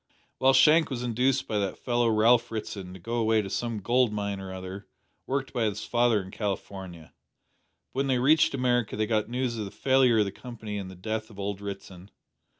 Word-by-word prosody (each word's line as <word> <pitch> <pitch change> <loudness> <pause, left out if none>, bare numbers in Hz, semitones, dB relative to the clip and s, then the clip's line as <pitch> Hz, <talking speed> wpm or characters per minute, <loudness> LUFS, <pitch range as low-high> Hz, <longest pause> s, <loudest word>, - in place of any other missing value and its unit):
Well, 135 +1 +5
Shank 155 +4 +5
was 125 -3 -4
induced 125 +2 +1
by 105 - 0
that 100 -2 -2
fellow 120 -1 +1
Ralph 115 +2 +4
Ritson 105 -4 -5
to - - -10
go 115 +7 -3
away 110 -1 +2
to 95 - -7
some 115 -1 -2
gold 120 +2 +2
mine 100 -2 -3
or 95 -1 -7
other 95 +2 -7 0.4
worked 135 0 -2
by 120 -3 +1
his 105 -1 -2
father 120 -2 +2
in 95 - -11
California, 95 -5 -5 0.8
but 130 - -3
when 135 - +1
they 130 -2 +2
reached 140 +3 +4
America 120 -3 +1
they 110 - +1
got 110 -1 0
news 120 -1 -2
of 105 - -3
the - - -6
failure 130 +2 +3
of 105 - +4
the 100 - -4
Company 110 -2 -7
and 95 -2 -6
the 95 - -10
death 110 +4 -4
of 105 - -15
old 100 0 -4
Ritson. 95 -2 -8
110 Hz, 210 wpm, -27 LUFS, 100-125 Hz, 0.8 s, Well